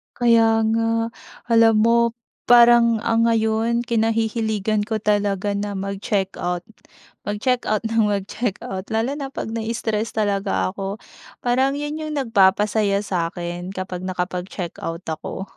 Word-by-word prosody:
Kaya 225 -2 +4
nga. 230 0 0 0.4
Alam 225 -1 +6
mo, 230 +1 +4 0.5
parang, 235 -2 +6
ah, 225 0 +1
ngayon 230 +1 +1
kinahihiligan 220 -2 0
ko 225 - -1
talaga 205 -2 0
na 200 0 -3
mag-checkout, 190 -2 -2 0.6
mag-check 240 +5 0
out 215 0 0
nang 225 -1 +2
mag-check 205 +1 -2
out, 190 0 -5
lalo 225 +4 -1
na 275 - -3
pag 270 -4 -6
nai-stress 225 -1 -2
talaga 195 - 0
ako. 195 +1 -4 0.5
Parang 260 +3 +2
'yon 295 +2 -4
yung 310 -1 -4
nagpapasaya 205 -4 +2
sa'kin, 175 0 -4
kapag 185 -1 -5
nakapag-check 180 -1 -4
out 165 +1 -5
ako. 175 +4 -5
215 Hz, 125 wpm, -22 LUFS, 195-230 Hz, 0.6 s, Alam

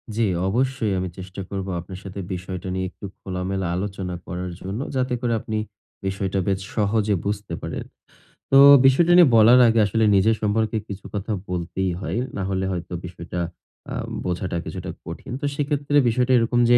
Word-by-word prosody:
জ্বি, 115 -1 +2 0.2
অবশ্যই। 125 -1 0
আমি 90 -1 -2
চেষ্টা 95 +1 -7
করবো 95 -1 -4
আপনার 90 +2 -8
সাথে 95 0 -7
বিষয়টা 90 +1 -5
নিয়ে 95 0 -1
একটু 100 - -11 0.2
খোলামেলা 95 0 -3
আলোচনা 95 -2 -3
করার 90 0 -4
জন্য, 95 +5 -4 0.2
যাতে 130 -1 0
করে 120 -2 0
আপনি 110 0 -3 0.5
বিষয়টা 95 0 -1
বেশ 95 -1 +1 0.2
সহজে 105 -1 +2
বুঝতে 105 0 -3
পারেন। - - -4 0.7
তো 135 - +7 0.3
বিষয়টা 165 +6 +5
নিয়ে 175 -4 +8
বলার 115 +3 +7
আগে 115 0 +3
আসলে 110 +3 +1
নিজের 110 +4 +4
সম্পর্কে 110 +1 +1
কিছু 100 -1 -8
কথা 105 +2 -3 0.2
বলতেই 90 +1 -2
হয়। 105 - -3 0.2
না 100 - -2
হলে 95 0 -1
হয়তো 90 0 -5
বিষয়টা 90 0 -6 0.5
আ - - -3 0.3
বোঝাটা 90 0 -2
কিছুটা - - -6 0.2
কঠিন। - - -8
তো - - -1
সেক্ষেত্রে 145 0 0
বিষয়টা 125 +2 +1
এরকম 120 +1 +2
যে 120 - +7
100 Hz, 170 wpm, -23 LUFS, 95-115 Hz, 0.7 s, নিয়ে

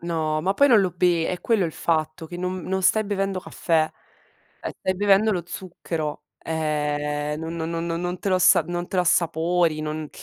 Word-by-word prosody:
No, 160 -2 -1
ma 190 +5 0
poi 280 0 +5
non 225 -5 +6
lo 185 - +1
be 175 -2 +2
è 180 - -3
quello 220 -5 +2
il 165 - -3
fatto, 155 0 -1
che 175 +2 -8
non 180 0 -3
non 190 0 -2
stai 215 +4 +4
bevendo 195 -2 -1
caffè, 160 -3 0 0.7
eh, - - -5
stai 185 - -1
bevendo 205 +2 +4
lo 180 -3 -1
zucchero, 165 -5 -5 0.2
ehm, 150 -1 -2
no 160 - -4 0.2
no 165 0 -3
no 165 0 -2
non 175 +1 -3
te - - -2
lo 185 - +3
as 185 - +6
non 175 0 -3
te - - -10
l'assapori, 170 -2 +2
non 155 0 -4
170 Hz, 195 wpm, -24 LUFS, 155-185 Hz, 0.7 s, non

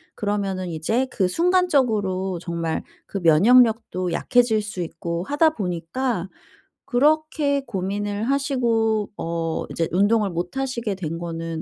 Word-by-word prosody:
그러면은 200 -3 -2
이제 175 +11 0
그 190 -3 +1
순간적으로 220 - +1
정말 170 -2 -3 0.2
그 200 - -5
면역력도 195 +1 +4
약해질 230 +4 +2
수 205 -4 -5
있고 170 +1 -4
하다 295 - +3
보니까 190 - -2 0.6
그렇게 290 +1 +2
고민을 205 0 -3
하시고 235 -5 +1
어 165 -1 -2
이제 165 - -1
운동을 205 +3 +3
못 175 +7 -4
하시게 245 -6 -2
된 165 -3 -4
거는 165 -1 -4
205 Hz, 270 characters per minute, -23 LUFS, 175-245 Hz, 0.6 s, 면역력도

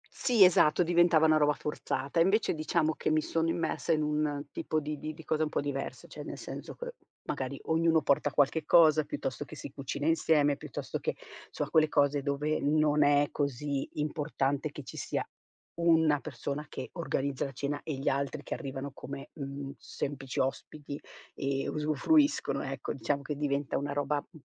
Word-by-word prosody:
Sì, 235 -6 +5
esatto, 180 -1 +5
diventava 170 -2 +4
una 155 -1 +5
roba 150 0 +4
forzata. 140 0 -2
Invece, 195 +5 +3
diciamo 155 0 +1
che - - -2
mi 155 - +3
sono 165 +1 0
immersa 165 0 0
in 155 -1 +1
un 150 -1 -1
tipo 155 - -1
di 150 0 -5
di 155 - -4
di 160 - -11
cosa 155 0 0
un 155 - -1
po' - - -1
diversa, 140 -1 -4
cioè, - - -8
nel - - -6
senso - - -7
che - - -6 0.3
magari - - -3
ognuno 160 0 +3
porta 140 +1 +2
qualche 145 +3 +2
cosa, 155 -1 +6
piuttosto 130 0 -4
che 155 - -11
si 145 - -8
cucina 140 +1 -4
insieme, 155 -3 +3
piuttosto - - -5
che, - - -2 0.3
so - - -2
quelle 155 -1 +4
cose 145 -1 +3
dove 145 +2 0
non 150 0 +3
è 145 0 +4
così 140 0 -2
importante 150 -1 -1
che 150 - -8
ci - - -9
sia - - -2 0.5
una 160 -3 +4
persona 145 +1 -5
che - - -6
organizza 140 -5 -1
la 135 - -5
cena 140 +2 -3
e 155 - -4
gli 135 - -5
altri 140 +2 0
che - - -4
arrivano 135 -1 -5
come, 140 0 -8
mhmm, 140 -2 -6
semplici 135 -2 -4
ospiti 140 +2 -3 0.3
e 135 0 -2
usufruiscono, 155 - +2
ecco, - - -4
diciamo 140 -1 -1
che 150 +1 -3
diventa 140 -1 -1
una 140 0 -3
roba, 145 0 0
m 160 - -14
150 Hz, 180 wpm, -30 LUFS, 140-155 Hz, 0.5 s, cosa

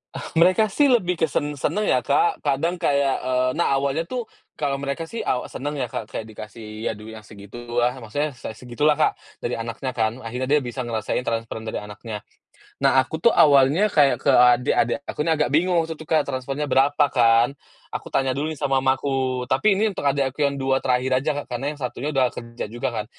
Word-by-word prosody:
Oh, - - -5 0.2
mereka 185 +4 +4
sih 290 +5 +4
lebih 180 -10 +2
ke 160 - +3
sen 145 0 -1
seneng 185 +11 0
ya, - - +3
Kak. 410 -3 +1
Kadang 165 +6 -1
kayak 140 -5 +2
eee, 130 0 0
nah, 140 - +2
awalnya 140 +4 -1
tuh 250 +4 -3 0.3
kalau 140 -2 -1
mereka 140 +3 -3
sih 225 +8 -7
awa 125 - -2
seneng 145 +3 -4
ya, 125 -5 -3
Kak, 105 - -4
kayak 110 - -5
dikasih, 110 +1 -8
aduh 105 +1 -7
yang 110 0 -10
segitu 100 +2 -11 0.2
ah 120 - +3
maksudnya 145 +7 -2
se 110 -3 -8
segitulah, 125 +6 +1
Kak, 155 - +1 0.2
dari 120 - -2
anaknya 120 +3 -4
kan, 110 -1 0
akhirnya 125 +3 -4
dia 150 +1 +4
bisa 120 +1 -6
ngerasain 115 +1 -2
transferan 115 -1 -3
dari - - -3
anaknya. 105 +1 -8 0.6
Nah, 130 - +4
aku 130 +5 -3
tuh 235 - +6
awalnya 145 +7 +5
kayak 145 -6 +3
ke - - -1
adek-adek 125 -1 +4
aku - - -6
nih 165 - +3
agak 150 -1 +1
bingung 170 +4 +3
gitu, 160 -1 -7
Kak, 155 -2 +1
transfernya 135 +3 -3
berapa 145 +3 +4
kan, 120 +2 +3 0.3
aku - - -6
tanya 135 -1 +1
dulu 150 +3 -2
nih 155 - -11
sama 135 0 +2
mamaku. 130 -1 0
Tapi 135 +12 +3
ini 220 0 +2
untuk - - -4
adek 140 -1 +2
aku 150 - +1
yang 140 - -1
2 135 0 +2
terakhir 125 +1 +1
aja, 155 - +1
Kak, - - -20
karena 140 +4 -3
yang - - -16
satunya 130 +2 -4
udah 130 -2 +3
kerja 115 0 -7
juga 120 +1 -3
kan. - - -4
135 Hz, 210 wpm, -23 LUFS, 120-150 Hz, 0.6 s, tuh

